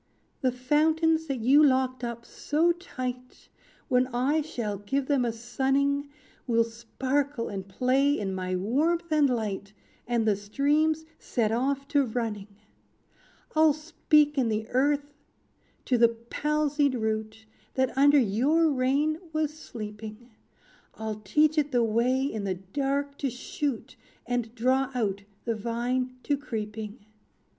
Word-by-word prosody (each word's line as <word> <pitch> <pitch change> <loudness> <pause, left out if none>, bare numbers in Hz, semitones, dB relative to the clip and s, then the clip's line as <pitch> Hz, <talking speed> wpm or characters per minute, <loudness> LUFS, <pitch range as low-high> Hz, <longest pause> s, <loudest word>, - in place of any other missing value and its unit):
"The 260 -3 +2
fountains 315 +5 +2
that 270 -4 -2
you 275 +6 +6
locked 260 -2 +2
up 235 0 -5
so 320 +4 +1
tight, 255 -8 -6 0.4
When 250 0 +3
I 260 +5 +1
shall 225 -9 -4
give 265 +7 -1
them 275 -2 +2
a 235 - 0
sunning, 270 +5 0 0.4
Will 230 -1 +4
sparkle 255 +3 -2
and 195 -1 -5
play 260 +8 +2
in 195 -2 -2
my 185 0 -2
warmth 315 - 0
and 300 -3 +4
light, 210 -4 -3 0.3
And 235 -2 +1
the 210 - +4
streams 295 +10 +1
set 220 -3 0
off 275 +4 0
to 285 -2 +3
running. 220 -4 -3 1.1
"I'll 310 -1 +6
speak 305 -1 +2
in 240 -3 +2
the 220 0 -1
earth 285 +2 +1 0.7
to 250 -2 +2
the 235 0 +7
palsied 285 +4 0
root, 220 -1 -3 0.3
That 260 -1 +1
under 285 +2 +6
your 280 +8 +3
reign 280 +4 +1
was 310 -1 0
sleeping; 220 -3 -9 0.6
I'll 215 -1 -5
teach 300 +10 +3
it 295 -1 -1
the 245 -2 +3
way 235 +4 +2
in 220 -7 -2
the 190 -2 -1
dark 275 +9 -2
to 275 - 0
shoot, 255 +1 -4 0.3
And 240 -1 -2
draw 260 +3 +2
out 200 -5 -1 0.2
the 230 - 0
vine 240 +3 -2
to 285 - +1
creeping. 215 -4 -6
255 Hz, 135 wpm, -27 LUFS, 225-285 Hz, 1.1 s, the